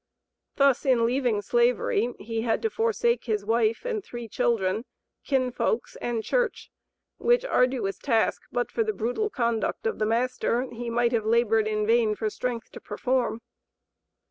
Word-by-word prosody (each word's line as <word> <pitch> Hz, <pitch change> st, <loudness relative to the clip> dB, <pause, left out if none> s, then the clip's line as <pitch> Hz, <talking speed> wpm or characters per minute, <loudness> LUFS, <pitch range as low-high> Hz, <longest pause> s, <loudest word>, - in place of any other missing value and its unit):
Thus 275 Hz, -2 st, +3 dB
in 250 Hz, -4 st, +3 dB
leaving 240 Hz, -4 st, +1 dB
slavery 475 Hz, -, +1 dB
he 225 Hz, 0 st, -4 dB
had 225 Hz, -, 0 dB
to 450 Hz, -, 0 dB
forsake 465 Hz, +2 st, +1 dB
his 210 Hz, -3 st, -1 dB
wife 225 Hz, -, +1 dB
and 450 Hz, -5 st, -2 dB
three 240 Hz, -7 st, -7 dB
children, 225 Hz, -3 st, 0 dB, 0.4 s
kinfolks 260 Hz, -, 0 dB
and 235 Hz, -2 st, -2 dB
church, -, -, -1 dB, 0.5 s
which 485 Hz, +1 st, +3 dB
arduous 250 Hz, -, +1 dB
task 230 Hz, -5 st, +1 dB
but 245 Hz, 0 st, -1 dB
for 455 Hz, -, +1 dB
the 435 Hz, 0 st, -1 dB
brutal 245 Hz, -, -1 dB
conduct 235 Hz, -, -1 dB
of 455 Hz, -, -1 dB
the 215 Hz, -, +1 dB
master 245 Hz, +1 st, 0 dB
he 235 Hz, 0 st, -5 dB
might 235 Hz, 0 st, +2 dB
have 225 Hz, -3 st, 0 dB
labored 225 Hz, -1 st, +3 dB
in 215 Hz, -1 st, 0 dB
vain 225 Hz, -1 st, +3 dB
for 215 Hz, 0 st, -2 dB
strength 245 Hz, 0 st, -4 dB
to -, -, -10 dB
perform. 250 Hz, -3 st, -1 dB
240 Hz, 155 wpm, -26 LUFS, 225-280 Hz, 0.5 s, Thus